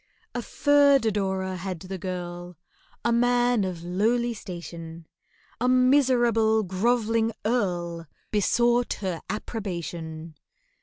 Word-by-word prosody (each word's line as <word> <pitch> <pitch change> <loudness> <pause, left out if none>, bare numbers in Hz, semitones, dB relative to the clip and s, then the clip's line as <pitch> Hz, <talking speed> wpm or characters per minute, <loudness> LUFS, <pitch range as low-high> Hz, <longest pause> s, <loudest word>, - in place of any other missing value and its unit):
A 245 - -2
third 285 0 +4
adorer 190 -3 -1
had 180 -2 -5
the 190 0 -6
girl, 175 -1 -6 0.5
A 235 - +3
man 245 -1 +3
of 180 -3 -4
lowly 225 +7 +1
station— 170 -5 -8 0.5
A 250 +2 +2
miserable 245 -4 +4
grov'ling 225 +3 +1
Earl 175 -8 -1 0.2
Besought 240 +3 +2
her 185 -4 -3
approbation. 170 -7 -5
205 Hz, 100 wpm, -26 LUFS, 175-240 Hz, 0.5 s, third